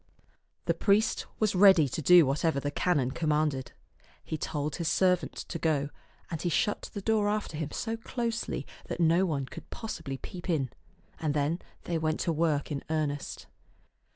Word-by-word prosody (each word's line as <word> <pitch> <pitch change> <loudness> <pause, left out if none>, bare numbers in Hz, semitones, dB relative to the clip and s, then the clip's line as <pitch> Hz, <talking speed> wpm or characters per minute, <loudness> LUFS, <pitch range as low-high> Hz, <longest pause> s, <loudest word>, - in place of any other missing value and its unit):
The - - +2
priest 215 +2 +2
was 215 -2 +2
ready 190 -5 +7
to 135 - -3
do 175 +2 +8
whatever 140 +2 +1
the 145 +1 -2
canon 145 -5 +1
com 155 +3 -1
manded. 150 -4 +1 0.6
He - - -4
told 150 -1 -3
his 170 - -2
servant 180 0 +2
to 165 - -5
go, 145 -3 +1 0.4
and 165 -2 -3
he 175 - 0
shut 205 +5 0
the 200 - -4
door 215 -1 +2
after 210 -6 -2
him 155 -1 -3
so 225 +8 -3
closely 230 0 -3 0.2
that - - -4
no 170 +3 +4
one 140 -5 -1
could - - -11
possibly 165 -11 -5
peep 175 +7 -8
in; 140 -8 +1 0.5
and 155 -3 -1
then 150 +4 +1 0.2
they 170 -2 -1
went 155 0 0
to 170 - +1
work 155 -2 +1
in 140 - -3
earnest. 150 -3 -2
160 Hz, 175 wpm, -29 LUFS, 145-185 Hz, 0.6 s, do